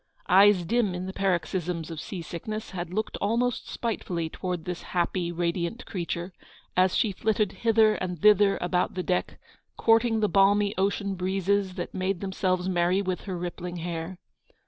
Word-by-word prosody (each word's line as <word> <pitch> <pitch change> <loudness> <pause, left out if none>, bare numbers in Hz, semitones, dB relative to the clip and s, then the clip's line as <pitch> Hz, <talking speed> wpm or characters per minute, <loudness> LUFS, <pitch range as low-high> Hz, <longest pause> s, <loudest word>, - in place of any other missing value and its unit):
Eyes 195 0 +6
dim 210 -1 +1
in 180 +1 -4
the 190 - -5
paroxysms 175 -3 -1
of 160 - -6
sea 180 -4 -6
sickness, 215 +7 -6
had 175 -2 -5
looked 215 +4 -2
almost 235 +3 0
spitefully 175 -8 -3
towards 180 0 -4
this 180 0 -5 0.2
happy, 175 0 0
radiant 175 +6 -2
creature, 175 -1 -4 0.4
as 185 0 +3
she 220 -5 +2
flitted 210 0 0
hither 220 -1 +3
and 180 -4 -4
thither 205 +1 +5
about 180 +1 0
the 185 - -2
deck, 180 0 -1 0.4
courting 225 0 +3
the 210 - +2
balmy 200 +1 +4
ocean 200 +1 0
breezes 190 +1 0
that 175 - -5
made 185 0 -1
themselves 185 -1 -1
merry 180 +1 +2
with 185 -1 -3
her 185 -3 -4
rippling 175 0 -5
hair. 170 +1 -4
185 Hz, 160 wpm, -27 LUFS, 175-205 Hz, 0.4 s, Eyes